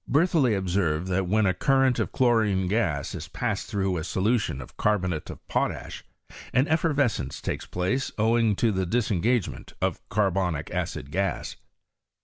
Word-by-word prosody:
Bertholiet 145 Hz, -, +3 dB
obsened 90 Hz, -4 st, 0 dB
that 95 Hz, 0 st, 0 dB
when 110 Hz, +3 st, +3 dB
a 95 Hz, -, +3 dB
current 135 Hz, +5 st, +2 dB
of -, -, -1 dB
chlo 120 Hz, -3 st, +3 dB
rine 95 Hz, -3 st, 0 dB
gas 90 Hz, -9 st, 0 dB
is -, -, -6 dB
passed -, -, -2 dB
through 95 Hz, -2 st, -1 dB
a 80 Hz, -, -3 dB
solution 100 Hz, -, 0 dB
of 60 Hz, -, -10 dB
carbonate 90 Hz, -7 st, 0 dB
of -, -, -10 dB
potash -, -, -2 dB, 0.5 s
an 130 Hz, +2 st, +4 dB
eSerrescence 140 Hz, -, 0 dB
takes -, -, -4 dB
place 95 Hz, +10 st, -1 dB
owing 110 Hz, 0 st, +3 dB
to 110 Hz, +1 st, +1 dB
tba 95 Hz, -2 st, -1 dB
disengagement 115 Hz, -1 st, 0 dB
of -, -, -1 dB
carbonic 95 Hz, -6 st, 0 dB
acid 70 Hz, +2 st, -3 dB
gas. 95 Hz, +1 st, -2 dB
100 Hz, 150 wpm, -26 LUFS, 90-120 Hz, 0.5 s, an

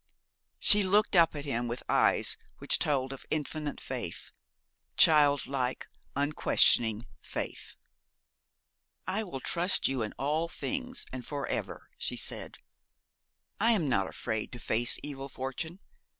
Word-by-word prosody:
She 210 Hz, -, +6 dB
looked 200 Hz, +1 st, +2 dB
up 165 Hz, -2 st, +5 dB
at 145 Hz, 0 st, -5 dB
him 120 Hz, -3 st, -1 dB
with 120 Hz, +1 st, -5 dB
eyes -, -, +3 dB, 0.2 s
which -, -, +2 dB
told 135 Hz, -2 st, 0 dB
of 135 Hz, -, -9 dB
infinite 150 Hz, -1 st, -3 dB
faith, -, -, -5 dB, 0.7 s
child 145 Hz, -3 st, +5 dB
like, 130 Hz, -2 st, -2 dB, 0.3 s
unquestioning 120 Hz, -5 st, +3 dB, 0.2 s
faith. -, -, -6 dB, 1.3 s
'I 220 Hz, +3 st, -2 dB
will 155 Hz, -8 st, -6 dB
trust 175 Hz, +6 st, +1 dB
you 135 Hz, -2 st, -1 dB
in 110 Hz, -, -3 dB
all 155 Hz, +4 st, 0 dB
things, 255 Hz, +7 st, -3 dB
and 130 Hz, -1 st, -5 dB
for 140 Hz, +2 st, -4 dB
ever,' -, -, -4 dB
she 480 Hz, -, -2 dB
said. -, -, -4 dB, 1.0 s
'I 230 Hz, +1 st, +4 dB
am 175 Hz, -9 st, +1 dB
not 95 Hz, -7 st, +2 dB
afraid 110 Hz, 0 st, -4 dB
to -, -, -6 dB
face 120 Hz, +2 st, +2 dB
evil 135 Hz, -1 st, -5 dB
fortune. 135 Hz, +8 st, -5 dB
145 Hz, 135 wpm, -30 LUFS, 130-170 Hz, 1.3 s, She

